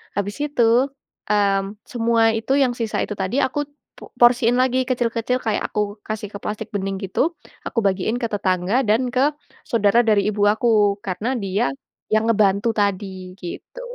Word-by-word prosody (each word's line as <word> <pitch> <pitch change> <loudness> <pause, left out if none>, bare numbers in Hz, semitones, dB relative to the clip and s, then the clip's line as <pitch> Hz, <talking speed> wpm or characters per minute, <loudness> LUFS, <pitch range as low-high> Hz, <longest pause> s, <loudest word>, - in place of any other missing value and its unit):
habis 205 +3 -2
itu, 255 -2 +2 0.4
mmm, 200 0 +1
semua 230 -1 +2
itu 225 +4 -1
yang 265 -3 +3
sisa 230 -2 -2
itu 210 - -4
tadi, 195 +8 -1
aku 290 +2 -1 0.3
po - - -13
porsiin 240 0 +5
lagi 255 0 +2
kecil-kecil. 245 0 0
Kayak 220 -2 -1
aku 210 0 -2
kasih 215 -1 -4
ke 200 - -4
plastik 210 +1 -4
bening 195 0 -2
gitu, 280 - 0 0.3
aku 235 - -1
bagiin 195 +3 +1
ke 230 - 0
tetangga 195 +4 +1
dan 230 +4 +2
ke 270 +4 +3 0.4
saudara 230 +1 +3
dari 210 -2 +3
ibu 205 -1 -1
aku. 210 -2 +3
Karena 210 +7 -2
dia 195 -7 0 0.4
yang 215 +1 +3
ngebantu 205 0 +2
tadi 190 -2 -2
gitu. 180 - -8
215 Hz, 160 wpm, -21 LUFS, 200-240 Hz, 0.4 s, porsiin